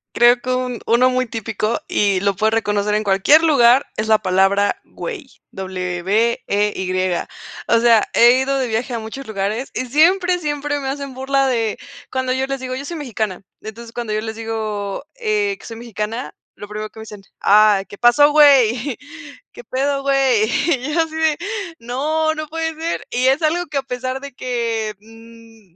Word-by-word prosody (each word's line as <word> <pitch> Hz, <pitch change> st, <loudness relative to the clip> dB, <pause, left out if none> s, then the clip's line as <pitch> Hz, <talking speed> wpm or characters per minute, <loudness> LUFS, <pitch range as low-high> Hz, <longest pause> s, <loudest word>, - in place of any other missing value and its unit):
Creo 240 Hz, +1 st, +5 dB
que 255 Hz, -, -3 dB
un 250 Hz, -2 st, -2 dB
uno 245 Hz, +3 st, +4 dB
muy 255 Hz, 0 st, 0 dB
típico 225 Hz, 0 st, -3 dB
y 200 Hz, -2 st, +1 dB
lo 200 Hz, +1 st, 0 dB
puedo 215 Hz, +4 st, +1 dB
reconocer 210 Hz, -2 st, 0 dB
en 215 Hz, +1 st, +1 dB
cualquier 200 Hz, +11 st, +4 dB
lugar 270 Hz, -5 st, +4 dB
es 215 Hz, -, -2 dB
la 220 Hz, -1 st, +4 dB
palabra 200 Hz, -, +2 dB
güey 420 Hz, -11 st, -7 dB, 0.3 s
W-E-Y. 190 Hz, 0 st, -1 dB, 0.5 s
O 230 Hz, -, +4 dB
sea, 230 Hz, -2 st, +4 dB
he 240 Hz, +1 st, +7 dB
ido 275 Hz, +1 st, 0 dB
de 260 Hz, -, -1 dB
viaje 235 Hz, +3 st, -2 dB
a 230 Hz, -, -2 dB
muchos 225 Hz, +5 st, -8 dB
lugares 215 Hz, +4 st, -3 dB
y 255 Hz, -, -3 dB
siempre 355 Hz, +7 st, +3 dB
siempre 290 Hz, -3 st, -2 dB
me 275 Hz, -, -5 dB
hacen 275 Hz, -1 st, -5 dB
burla 270 Hz, +1 st, +1 dB
de 230 Hz, -4 st, -1 dB, 0.3 s
cuando 260 Hz, -1 st, -1 dB
yo 260 Hz, +1 st, 0 dB
les 275 Hz, 0 st, -4 dB
digo 255 Hz, 0 st, -5 dB
yo 275 Hz, +2 st, -6 dB
soy 340 Hz, +2 st, -6 dB
mexicana. 220 Hz, -, -4 dB, 0.2 s
Entonces 225 Hz, +2 st, -9 dB
cuando 235 Hz, -3 st, -4 dB
yo 215 Hz, -, -1 dB
les 220 Hz, 0 st, -5 dB
digo, 215 Hz, -2 st, -4 dB
eh, 425 Hz, -4 st, -1 dB
que -, -, -14 dB
soy 225 Hz, -, -8 dB
mexicana, 230 Hz, +1 st, -5 dB, 0.2 s
lo 205 Hz, -, -9 dB
primero 215 Hz, +1 st, -6 dB
que -, -, -13 dB
me -, -, -7 dB
dicen: 210 Hz, -2 st, -11 dB, 0.2 s
"Ay, 205 Hz, -1 st, +4 dB
qué 205 Hz, -, -12 dB
pasó, 240 Hz, +6 st, +5 dB
güey, 270 Hz, -4 st, +4 dB, 0.5 s
qué 480 Hz, -, -11 dB
pedo 275 Hz, -, -1 dB
güey", 270 Hz, -5 st, +3 dB
y 275 Hz, +3 st, 0 dB
yo 330 Hz, -, +3 dB
asi 320 Hz, -1 st, -4 dB
de: 320 Hz, -2 st, +1 dB, 0.4 s
"No 310 Hz, +7 st, -1 dB
no 310 Hz, 0 st, -5 dB
puede 320 Hz, +1 st, -3 dB
ser". 330 Hz, +1 st, -3 dB
Y 250 Hz, +1 st, -1 dB
es 270 Hz, +4 st, +3 dB
algo 330 Hz, +3 st, +1 dB
que 295 Hz, -3 st, -4 dB
a -, -, +1 dB
pesar 255 Hz, 0 st, -4 dB
de 280 Hz, -1 st, -9 dB
que, 230 Hz, -4 st, -2 dB
mm, 225 Hz, -2 st, -17 dB
240 Hz, 185 wpm, -19 LUFS, 215-275 Hz, 0.5 s, he